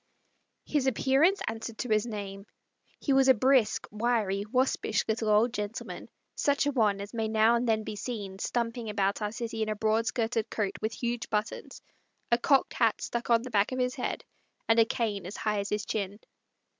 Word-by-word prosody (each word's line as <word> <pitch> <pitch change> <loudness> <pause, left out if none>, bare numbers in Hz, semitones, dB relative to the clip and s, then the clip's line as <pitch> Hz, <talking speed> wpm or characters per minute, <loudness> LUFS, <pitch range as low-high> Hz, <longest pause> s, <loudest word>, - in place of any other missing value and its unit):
His 285 -3 0
appearance 270 - +3
answered 225 0 -5
to 250 - -4
his 215 +1 +2
name. 200 -2 -6 0.5
He 280 - +1
was 270 0 +5
a 260 - +7
brisk, 255 0 +3
wiry, 210 -3 0
waspish 255 -4 +1
little 220 0 0
old 220 +3 +4
gentleman, 210 0 -5 0.2
such 285 -1 +1
a 290 - +1
one 215 -6 +2
as 200 +3 -7
may 225 -1 -1
now 220 +1 +4
and 235 +1 +1
then 220 -1 +2
be 210 - -5
seen 205 -3 -5
stumping 235 0 -2
about 200 0 0
our 210 0 -1
city 230 -1 -4
in 215 - 0
a 215 - -1
broad 220 +2 +1
skirted 225 -1 -1
coat 205 -3 -2
with 220 +1 -1
huge 240 0 -2
buttons, 210 +1 -3 0.5
a 235 - +4
cocked 275 +1 +3
hat 225 -3 +2
stuck 235 0 -4
on 230 -1 +4
the 255 - -7
back 205 +1 +2
of 255 - -3
his 250 0 0
head, - - -4 0.4
and 225 0 +4
a 225 - +7
cane 210 -5 -2
as 195 - -7
high 210 -1 0
as 200 - -3
his 210 +1 -2
chin. 205 -1 -3
225 Hz, 195 wpm, -29 LUFS, 210-240 Hz, 0.5 s, a